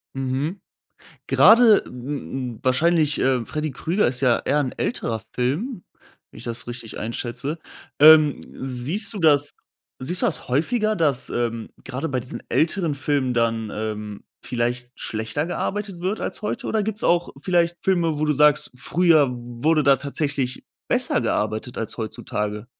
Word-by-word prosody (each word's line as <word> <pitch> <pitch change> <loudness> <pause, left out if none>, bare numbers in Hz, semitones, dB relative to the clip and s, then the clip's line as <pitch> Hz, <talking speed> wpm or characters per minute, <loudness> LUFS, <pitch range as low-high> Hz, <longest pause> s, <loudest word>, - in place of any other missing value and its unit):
Mhm. 135 +8 -2 0.7
Grade, 225 -2 +6
m 125 -1 -5
m - - -16
wahrscheinlich, 150 +3 +2
äh, 130 -3 +1
Freddy 155 +2 -3
Krueger 170 +10 0
ist 130 +2 -2
ja 125 -3 +3
eher 145 +2 +2
'n 130 -4 -1
älterer 115 - -2
Film, 175 - -2 0.5
wenn - - -15
ich 110 - -10
das 120 -1 -4
richtig 120 -2 -7
einschätze. 120 +7 -4 0.4
Ähm, 155 -1 +7
siehst 135 - -2
du 205 - -5
das 145 -3 +3 0.5
siehst 175 +8 -2
du - - +4
das - - -2
häufiger, 215 - +1
dass, 145 -6 +1
ähm, 115 -2 -2 0.2
grade 135 +6 -4
bei 130 -2 -1
diesen 120 -1 -8
älteren 160 - +1
Filmen 140 -3 0
dann, 115 -2 0
ähm, 105 -1 -5 0.2
vielleicht 125 0 -2
schlechter 110 +7 -3
gearbeitet 195 +1 -3
wird 195 +4 -1
als - - -4
heute, 210 - -3
oder 220 -1 0
gibt's 215 +1 -3
auch 175 0 +2
vielleicht 175 0 +1
Filme, 170 -5 +1
wo 155 - +1
du 150 - +2
sagst: 150 +1 +3
„Früher 155 +1 +3
wurde 120 +6 0
da 140 0 +6
tatsächlich 140 -2 -3 0.2
besser - - +2
gearbeitet 110 +3 -2
als 110 - -4
heutzutage?“ 105 -1 -4
140 Hz, 155 wpm, -23 LUFS, 120-165 Hz, 0.7 s, Ähm